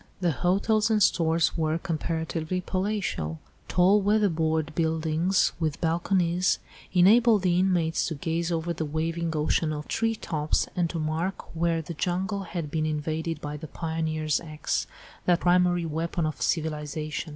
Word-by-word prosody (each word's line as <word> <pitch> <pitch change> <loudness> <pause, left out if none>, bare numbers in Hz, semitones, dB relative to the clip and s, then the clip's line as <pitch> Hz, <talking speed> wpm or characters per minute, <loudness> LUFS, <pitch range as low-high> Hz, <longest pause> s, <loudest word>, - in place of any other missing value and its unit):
The 175 -2 +2
hotels 200 - +1
and 215 -2 +3
stores 165 -1 +2
were 160 -1 0
comparatively 165 0 -2
palatial. 185 - -2 0.3
Tall 190 +3 +4
weatherboard 160 -7 +1
buildings 160 +3 +1
with 155 -3 -1
balconies, 175 +1 +1 0.3
enabled 210 +3 +5
the 180 -1 +3
inmates 175 -4 +1
to 160 - -3
gaze 165 +3 -2
over 165 +1 -1
the 160 - -3
waving 165 +2 -2
ocean 155 +1 +1
of 150 0 -5
tree 225 0 0
tops 155 -7 -1
and 175 -2 +1
to 170 - -4
mark 165 +4 -3
where 165 0 +1
the 170 - -6
jungle 190 +5 -1
had 165 -4 -5
been 155 0 0
invaded 155 +1 -2
by 150 -1 -5
the 155 +1 -8
pioneer's 160 -1 -1
axe, 155 -2 -2 0.4
that 175 -1 +3
primary 175 -1 +3
weapon 165 +1 -2
of 155 -3 -4
civilisation. 155 -1 -2
165 Hz, 145 wpm, -27 LUFS, 155-180 Hz, 0.4 s, enabled